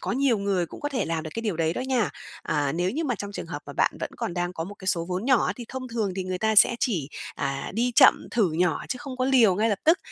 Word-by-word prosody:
có - - -2
nhiều 255 -3 +2
người 195 -3 0
cũng - - -11
có 290 - -2
thể 275 -3 -1
làm 165 -1 -2
được 155 - -6
cái - - -2
điều 210 -7 -1
đấy 160 -1 +1
đó - - -4
nha. 255 -5 0 0.3
À, 145 -2 0
nếu 175 +3 0
như 315 +9 -2
mà 250 -5 0
trong 205 0 -6
trường - - -6
hợp - - -6
mà - - -7
bạn - - +2
vẫn - - -3
còn 175 - -3
đang 175 0 -2
có 165 -2 -4
một 205 - -8
cái 190 - -12
số 170 -3 +1
vốn 185 +3 -2
nhỏ 255 -3 +3
á, 180 - 0
thì 240 - -7
thông 260 0 -6
thường 225 -5 -1
thì 190 - -2
người 185 0 -3
ta 220 +1 +1
sẽ 225 +3 +6
chỉ, 180 - 0 0.3
à, 135 0 -3
đi 240 +3 +1
chậm - - +6
thử 215 -7 +2
nhỏ 165 -1 0
chứ 255 - -2
không 275 -2 -7
có 255 - 0
liều 250 -7 +5
ngay 215 +4 +1
lập 205 -3 0
tức. 325 +3 +5
205 Hz, 310 wpm, -26 LUFS, 175-250 Hz, 0.3 s, sẽ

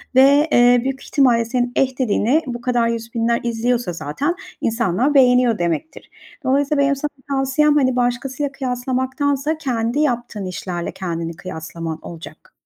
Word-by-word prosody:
ve, 280 +4 +6
eee, 245 0 +5
büyük 270 0 -3
ihtimalle 245 -5 +3
senin 245 +1 -1
eh 260 -1 0
dediğini 255 +5 +2
bu 240 -1 -5
kadar 240 -2 +1
yüz 230 0 -4
binler 235 0 +1
izliyorsa 235 -4 -1
zaten 165 - -2 0.3
insanlar 230 +4 +1
beğeniyor 250 -4 +4
demektir. 175 - -3 0.3
Dolayısıyla 280 +2 +2
benim 280 0 +2
sana 295 +2 -3 0.2
tavsiyem, 275 +2 +2
hani, 260 -3 +2
başkasıyla 250 +3 -1
kıyaslamaktansa 260 +3 -1
kendi 245 -3 -1
yaptığın 240 -7 -1
işlerle 180 -1 -4
kendini 170 -2 -4
kıyaslaman 160 0 -6
olacak. 170 0 -11
245 Hz, 135 wpm, -20 LUFS, 225-275 Hz, 0.3 s, ve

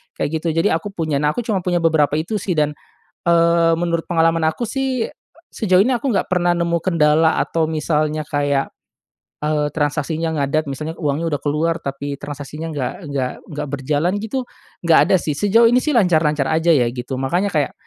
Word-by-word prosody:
kayak 160 +1 -2
gitu - - -1
jadi 165 +3 +2
aku 185 +5 -4
punya. 160 -6 -1
Nah 150 - +3
aku - - -3
cuma 205 -5 -1
punya 175 -1 +1
beberapa 155 -3 +2
itu 170 +8 -3
sih 200 -2 -2
dan, 150 -1 +1 0.5
eee, 170 0 +4
menurut 170 -1 -1
pengalaman 165 -2 +2
aku 160 +9 -2
sih, 260 -1 -2 0.4
sejauh 185 -3 +3
ini 240 - +1
aku 245 0 -1
nggak 190 - -1
pernah 175 -1 +2
nemu 170 0 0
kendala 160 -2 +3
atau 165 -1 0
misalnya 155 -1 -1
kayak, 145 -2 0 0.7
eee, 150 0 +1
transaksinya 155 +2 -1
ngadat 150 +3 0
misalnya 155 +4 -5
uangnya 150 +1 -1
udah - - -12
keluar 155 +3 0
tapi 140 +1 -4
transaksinya 145 +2 -6
nggak 135 -5 -3 0.2
nggak 130 -3 -1 0.2
nggak 150 -1 -5
berjalan 145 +6 0
gitu 245 +3 -3 0.4
nggak 165 -1 +5
ada - - +6
sih 150 -3 -3
sejauh 225 +6 +4
ini 245 +2 +4
sih 305 - 0
lancar-lancar 155 -8 +2
aja 160 +2 +3
ya 130 -6 +3
gitu 125 +2 -5
makanya 175 +9 0
kayak 150 -4 0
160 Hz, 180 wpm, -20 LUFS, 150-175 Hz, 0.7 s, ada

